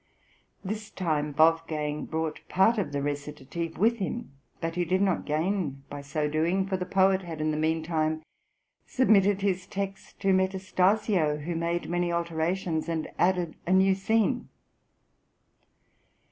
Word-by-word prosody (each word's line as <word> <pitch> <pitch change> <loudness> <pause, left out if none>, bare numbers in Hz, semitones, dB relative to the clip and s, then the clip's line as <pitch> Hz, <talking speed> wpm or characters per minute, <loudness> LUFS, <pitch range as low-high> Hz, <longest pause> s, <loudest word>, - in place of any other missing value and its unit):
This 210 +2 -4
time 150 -5 -1
Wolfgang 155 -2 +2
brought 160 -1 -3
part 215 +5 +4
of 175 -8 -2
the 140 -1 -2
recitative 150 +3 -4
with 230 +4 +3
him, 230 +1 -4 0.3
but 165 0 -2
he 175 +1 0
did 180 +2 +1
not 195 -2 +1
gain 155 -3 -1
by 145 0 -5
so 150 +2 -2
doing; 165 +6 +1
for 190 0 -1
the 180 -1 -3
poet 190 0 +3
had 165 -4 -7
in 155 0 +1
the - - -1
meantime 160 0 0 0.6
submitted 205 -6 +3
his 185 -2 0
text 195 -1 -5
to 195 -1 +3
Metastasio, 190 -3 +1
who 170 +3 -3
made 170 +1 -1
many 175 0 0
alterations, 170 0 -1
and 160 -2 -2
added 180 -3 +1
a 185 - +3
new 190 +1 +5
scene. 220 +6 +1
175 Hz, 145 wpm, -28 LUFS, 155-190 Hz, 0.6 s, new